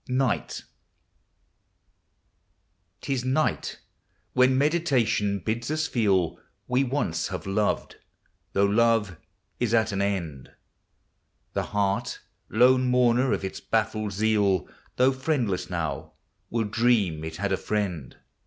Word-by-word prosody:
'T 130 Hz, -1 st, -1 dB, 2.5 s
is 125 Hz, -2 st, -2 dB
night, 135 Hz, +5 st, 0 dB, 0.6 s
when 130 Hz, 0 st, +4 dB
Meditation 135 Hz, -9 st, +1 dB
bids 115 Hz, +6 st, -3 dB
ns 155 Hz, +1 st, 0 dB
feel 100 Hz, -, +1 dB, 0.3 s
We 125 Hz, +2 st, +2 dB
once 120 Hz, -, -1 dB
have 95 Hz, -2 st, -6 dB
loved, 100 Hz, +2 st, -1 dB, 0.6 s
though 100 Hz, -, +3 dB
love 105 Hz, -3 st, +2 dB, 0.4 s
is 120 Hz, -1 st, +1 dB
at 110 Hz, -1 st, +2 dB
an 100 Hz, 0 st, -1 dB
end: 85 Hz, -9 st, -3 dB, 1.0 s
The -, -, 0 dB
heart, 100 Hz, -1 st, -1 dB, 0.3 s
lone 125 Hz, +3 st, +4 dB
mourner 125 Hz, +1 st, +3 dB
of -, -, -1 dB
its 95 Hz, -, -5 dB
baffled 110 Hz, -2 st, -1 dB
zeal. 100 Hz, -4 st, +2 dB, 0.3 s
Though 130 Hz, +1 st, +4 dB
friendless 130 Hz, -, -1 dB
now, 85 Hz, -5 st, -4 dB, 0.4 s
will 115 Hz, -1 st, 0 dB
dream 105 Hz, -7 st, +1 dB
it 80 Hz, 0 st, -5 dB
had 100 Hz, +3 st, -2 dB
a -, -, +3 dB
friend. 90 Hz, -, -3 dB
110 Hz, 115 wpm, -26 LUFS, 95-125 Hz, 2.5 s, when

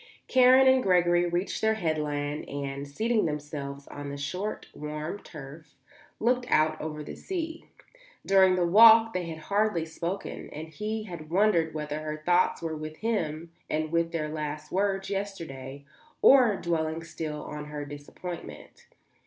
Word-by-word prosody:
Karen 260 Hz, +1 st, +6 dB
and 260 Hz, 0 st, +5 dB
Gregory 175 Hz, -3 st, +3 dB
reached 175 Hz, +2 st, -2 dB
their 220 Hz, 0 st, +3 dB
headland 150 Hz, -5 st, -2 dB
and, 140 Hz, 0 st, -4 dB
seating 220 Hz, +9 st, 0 dB
themselves 145 Hz, -2 st, -5 dB
on 145 Hz, 0 st, -7 dB
the 140 Hz, -, -5 dB
short, 185 Hz, +9 st, -4 dB
warm 150 Hz, +5 st, -5 dB
turf, 150 Hz, 0 st, -11 dB, 0.4 s
looked 245 Hz, +2 st, +1 dB
out 155 Hz, 0 st, +2 dB
over 150 Hz, -1 st, -5 dB
the -, -, -7 dB
sea. 330 Hz, -3 st, -5 dB, 0.6 s
During 190 Hz, -1 st, +5 dB
the 180 Hz, -1 st, +2 dB
walk 225 Hz, +4 st, +8 dB
they 180 Hz, -2 st, -2 dB
had 160 Hz, -1 st, -6 dB
hardly 200 Hz, 0 st, 0 dB
spoken, 170 Hz, +4 st, -5 dB
and 155 Hz, +2 st, -7 dB
he 215 Hz, +5 st, -4 dB
had 170 Hz, -6 st, -9 dB
wondered 170 Hz, -4 st, +2 dB
whether 150 Hz, 0 st, -3 dB
her 155 Hz, 0 st, -5 dB
thoughts 175 Hz, -1 st, +2 dB
were 160 Hz, -1 st, -2 dB
with 155 Hz, 0 st, -7 dB
him 165 Hz, -8 st, -2 dB, 0.2 s
and 155 Hz, 0 st, -1 dB
with 170 Hz, 0 st, +1 dB
their 160 Hz, -2 st, -2 dB
last 150 Hz, -1 st, -5 dB
words 195 Hz, 0 st, 0 dB
yesterday, 145 Hz, -9 st, -5 dB, 0.4 s
or 250 Hz, -6 st, +7 dB
dwelling 165 Hz, -2 st, -2 dB
still 155 Hz, -2 st, -5 dB
on 150 Hz, 0 st, -6 dB
her 150 Hz, -1 st, -6 dB
disappointment. 145 Hz, +4 st, -9 dB
165 Hz, 150 wpm, -28 LUFS, 150-195 Hz, 0.6 s, walk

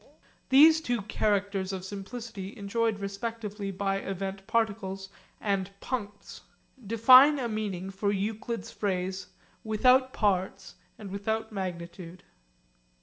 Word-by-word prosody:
These 315 Hz, +4 st, +7 dB
two 240 Hz, -8 st, -1 dB
characters 200 Hz, -2 st, 0 dB
of 190 Hz, -1 st, -5 dB
simplicity 205 Hz, +1 st, -7 dB
enjoyed 220 Hz, +2 st, 0 dB
respectively 205 Hz, 0 st, -5 dB
by 195 Hz, 0 st, -1 dB
event 195 Hz, 0 st, -5 dB
particles 200 Hz, -4 st, -1 dB, 0.3 s
and 195 Hz, -2 st, -1 dB
puncts 205 Hz, -5 st, -6 dB, 0.4 s
define 255 Hz, +7 st, +7 dB
a 255 Hz, -3 st, -2 dB
meaning 200 Hz, -4 st, -3 dB
for 200 Hz, +1 st, -1 dB
Euclid's 215 Hz, +3 st, -3 dB
phrase, 185 Hz, -2 st, -2 dB, 0.4 s
'without 255 Hz, +4 st, +4 dB
parts 190 Hz, -2 st, -1 dB, 0.2 s
and 200 Hz, -3 st, -9 dB
without 220 Hz, +3 st, -2 dB
magnitude.' 180 Hz, -2 st, -6 dB
200 Hz, 105 wpm, -28 LUFS, 195-225 Hz, 0.4 s, These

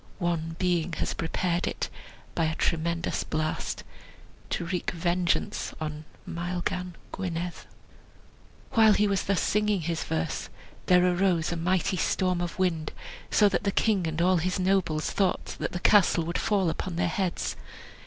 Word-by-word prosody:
One 165 Hz, -3 st, -1 dB
Being 175 Hz, -2 st, +1 dB
has -, -, -1 dB
prepared 175 Hz, +2 st, -1 dB
it, -, -, -2 dB, 0.5 s
By 165 Hz, -, +1 dB
a 160 Hz, 0 st, -1 dB
tremendous 170 Hz, 0 st, 0 dB
blast, 155 Hz, 0 st, -2 dB, 0.7 s
To 175 Hz, -, -2 dB
wreak 180 Hz, 0 st, -1 dB
vengeance 175 Hz, 0 st, 0 dB
On 155 Hz, -1 st, -4 dB, 0.2 s
Maelgan 175 Hz, +1 st, -3 dB, 0.2 s
Gwynedd." 175 Hz, -2 st, -3 dB, 1.2 s
While 220 Hz, -4 st, +6 dB
he 210 Hz, +1 st, +3 dB
was 200 Hz, -1 st, 0 dB
thus 200 Hz, -2 st, +2 dB
singing 210 Hz, -2 st, +2 dB
his 165 Hz, 0 st, -2 dB
verse, 80 Hz, 0 st, -2 dB, 0.4 s
there 180 Hz, 0 st, +6 dB
arose 180 Hz, -2 st, +2 dB
a -, -, -1 dB
mighty 180 Hz, +2 st, +1 dB
storm 180 Hz, 0 st, +1 dB
of 175 Hz, -1 st, -3 dB
wind, 170 Hz, -5 st, 0 dB, 0.4 s
so 210 Hz, -, +5 dB
that 195 Hz, -, 0 dB
the 200 Hz, -, +1 dB
king 195 Hz, -5 st, +2 dB
and 160 Hz, 0 st, -3 dB
all 185 Hz, 0 st, +4 dB
his 185 Hz, +3 st, 0 dB
nobles 180 Hz, -5 st, +1 dB
thought 195 Hz, -2 st, 0 dB
that -, -, -2 dB
the 175 Hz, -, -3 dB
castle 185 Hz, -3 st, +5 dB
would 170 Hz, +2 st, -2 dB
fall 195 Hz, -5 st, +2 dB
upon 175 Hz, +2 st, -4 dB
their 175 Hz, +1 st, +1 dB
heads. 180 Hz, +1 st, -1 dB
175 Hz, 155 wpm, -28 LUFS, 165-185 Hz, 1.2 s, While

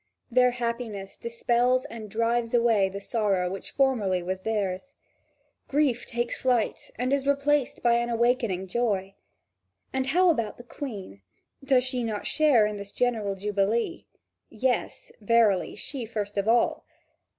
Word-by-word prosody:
Their 250 Hz, +1 st, +5 dB
happiness 235 Hz, -5 st, -4 dB
dispels 240 Hz, +2 st, +1 dB
and 225 Hz, -6 st, -8 dB
drives 230 Hz, +2 st, 0 dB
away 225 Hz, -5 st, +3 dB
the 200 Hz, +1 st, -6 dB
sorrow 200 Hz, -4 st, 0 dB
which 195 Hz, -, -6 dB
formerly 215 Hz, -10 st, +1 dB
was 185 Hz, +1 st, -3 dB
theirs. 210 Hz, +4 st, -2 dB, 0.7 s
Grief 270 Hz, -4 st, +1 dB
takes 240 Hz, 0 st, -3 dB
flight 245 Hz, -4 st, 0 dB
and 250 Hz, +3 st, -1 dB
is 275 Hz, 0 st, 0 dB
replaced 280 Hz, -1 st, +1 dB
by 235 Hz, -1 st, +4 dB
an 235 Hz, 0 st, -1 dB
awakening 235 Hz, -5 st, +1 dB
joy. 195 Hz, -2 st, -1 dB, 0.8 s
And 265 Hz, 0 st, -1 dB
how 360 Hz, +5 st, +4 dB
about 230 Hz, -9 st, -2 dB
the 240 Hz, -, -11 dB
Queen? 205 Hz, -, -7 dB, 0.4 s
Does 260 Hz, -2 st, +3 dB
she 255 Hz, -1 st, -2 dB
not 215 Hz, -3 st, -3 dB
share 290 Hz, -8 st, +4 dB
in 210 Hz, 0 st, -3 dB
the 200 Hz, -, -6 dB
general 215 Hz, -2 st, -1 dB
jubilee? 210 Hz, -, -1 dB, 0.4 s
Yes, 250 Hz, +2 st, -1 dB
verily, 215 Hz, -3 st, +3 dB
she 260 Hz, -6 st, -5 dB
first 210 Hz, -2 st, -4 dB
of 200 Hz, +1 st, -1 dB
all. 235 Hz, +1 st, +2 dB
235 Hz, 140 wpm, -27 LUFS, 205-250 Hz, 0.8 s, Their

